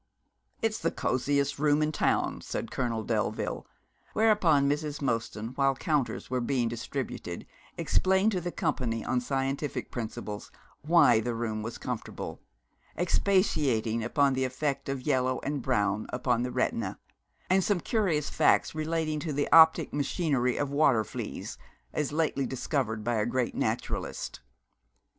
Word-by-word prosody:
'It's 225 -1 +1
the 165 - +1
cosiest 140 0 0
room 150 0 +3
in 155 - 0
town,' - - 0
said - - -4
Colonel 115 -4 -1
Delville, - - -2 0.5
whereupon 185 -10 +4
Mrs. 150 +1 -1
Mostyn, 115 -4 -2
while 135 +1 +1
counters 145 -2 -1
were 130 -1 -1
being 120 0 +1
distributed, 115 -6 -5 0.3
explained 190 +3 +2
to 185 -3 -1
the 175 +1 -3
company 115 -8 -1
on 125 -1 +1
scientific 135 +2 -2
principles 110 -3 -5 0.3
why 165 -7 +5
the 120 +1 -2
room 110 -2 -2
was 115 +2 -5
comfortable, 125 -3 -5 0.6
expatiating 150 - +1
upon 140 +3 +2
the 130 0 0
effect 135 +2 -2
of 135 -2 -3
yellow 130 -3 +1
and 145 -1 -2
brown 105 -4 0
upon 125 -1 0
the 125 +1 -2
retina, 115 -5 -1 0.5
and 190 +1 +3
some 200 -2 +1
curious 170 -8 0
facts - - +3
relating 155 0 -1
to 155 +1 -3
the 145 0 0
optic 160 0 +7
machinery 140 -3 0
of 145 -1 -1
water 140 -6 +4
fleas, - - -6 0.3
as 150 -2 -1
lately 150 -3 0
discovered 125 -5 -2
by 120 +1 0
a 105 - +1
great 125 0 0
naturalist. - - -3
135 Hz, 140 wpm, -29 LUFS, 120-155 Hz, 0.6 s, optic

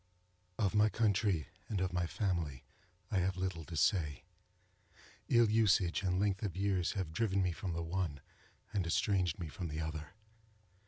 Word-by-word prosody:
Of 100 -4 +1
my 105 0 +5
country 105 -7 +1 0.2
and 105 - -1
of 95 -1 -1
my 90 -1 0
family 85 - -2 0.5
I 100 - +2
have 95 +1 0
little 90 -3 -2
to 80 0 -6
say. 75 -2 +1 1.1
Ill 120 -1 +6
usage 105 -5 +3
and 90 -2 +1
length 100 -1 +1
of 100 -5 -3
years 95 -3 +1
have 90 -5 -3
driven 100 -2 +1
me 90 - +1
from 85 +2 -4
the 85 0 -2
one, 85 -4 -2 0.5
and 95 -4 0
estranged 90 -1 +1
me 85 - -4
from 85 +4 -5
the 75 0 -4
other. 80 +3 -5
95 Hz, 165 wpm, -35 LUFS, 85-100 Hz, 1.1 s, Ill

